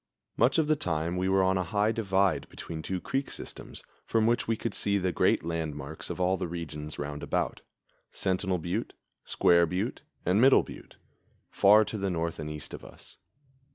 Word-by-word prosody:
Much - - +3
of 160 - +3
the 155 - +4
time 85 - -2
we 95 +1 0
were 95 0 +4
on 95 0 +2
a - - +1
high 105 +4 +1
divide 95 -5 +1
between 80 -1 -7
two 95 +3 -3
creek 135 +8 -2
systems, - - -8 0.2
from 110 -1 +2
which 120 +1 +1
we 115 -1 +1
could - - -3
see 100 -1 +1
the 95 -2 0
great - - +2
landmarks 80 -4 -4
of - - -5
all 95 +1 +2
the 90 - -3
regions 75 -3 -6
roundabout 75 0 -2 0.5
Sentinel 95 0 0
Butte, 85 +1 -3 0.3
Square 85 -1 +4
Butte 95 +8 -2 0.2
and 95 +5 +3
Middle 135 +1 +6
Butte, - - -12 0.6
far 105 +2 +6
to 110 - -5
the 100 0 -1
north 85 -2 -2
and 75 -1 -4
east 75 -1 -7
of - - -8
us. - - -15
90 Hz, 185 wpm, -29 LUFS, 85-100 Hz, 0.6 s, Middle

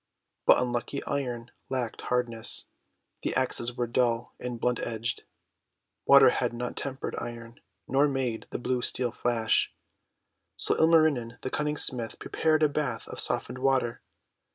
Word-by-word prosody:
But - - +8
unlucky 120 +2 -2
Iron 125 -4 -3 0.2
lacked 125 -3 -3
hardness; 120 -2 0 0.6
the - - -2
axes 120 - +1
all 120 - -11
were 120 - 0
dull 120 -1 0
and 125 -2 -5
blunt 125 +1 +1
edged. 115 +1 -3 0.8
Water 135 -2 +8
had 120 -1 -1
not 120 +1 -4
tempered 135 -1 -4
Iron, 115 +2 -8 0.3
nor 140 +2 +4
made 130 -5 -2
the - - -3
blue 125 +1 -1
Steel 125 0 -1
flash. 115 -2 +1 0.9
So - - +1
Ilmarinen 155 -8 +3
the 130 - -3
Cunning 150 0 -1
Smith 120 -5 0
prepared 155 -1 +1
a - - +7
bath 145 -2 -2
of - - -6
softened 125 +1 0
water. 130 -3 +1
125 Hz, 145 wpm, -28 LUFS, 120-135 Hz, 0.9 s, But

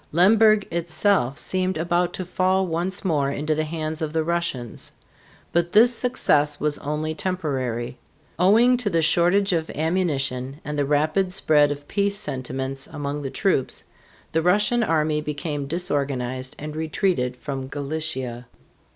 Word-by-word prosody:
Lemberg 215 +5 +5
itself 170 -4 +1
seemed 185 -1 0
about 175 +2 +1
to 185 - -4
fall 185 +1 +1
once 180 +3 -3
more 145 -6 +1
into 150 +2 -1
the 155 +1 -1
hands 155 0 -4
of 155 -1 -3
the 160 -1 +1
Russians. 165 -8 -3 0.6
But 170 0 +1
this 235 +3 +6
success 150 - +1
was 150 0 -1
only 150 +2 -2
temporary. 135 -10 -2 0.4
Owing 230 +7 +5
to 240 -4 0
the 165 -3 +1
shortage 180 +5 +3
of 165 -1 -1
ammunition 145 -5 -1
and 150 - -3
the 145 - +2
rapid 155 +6 +1
spread 150 -4 +4
of 145 0 -6
peace 200 0 0
sentiments 135 -4 -4
among 145 -1 -4
the 135 - -4
troops, 135 -1 0 0.5
the 160 - +1
Russian 205 +7 +3
army 155 -6 +1
became 145 -1 -4
disorganized 135 -6 -2
and 150 +1 -7
retreated 155 -5 0
from 135 0 -5
Galicia. 140 -4 -3
155 Hz, 140 wpm, -23 LUFS, 140-180 Hz, 0.6 s, this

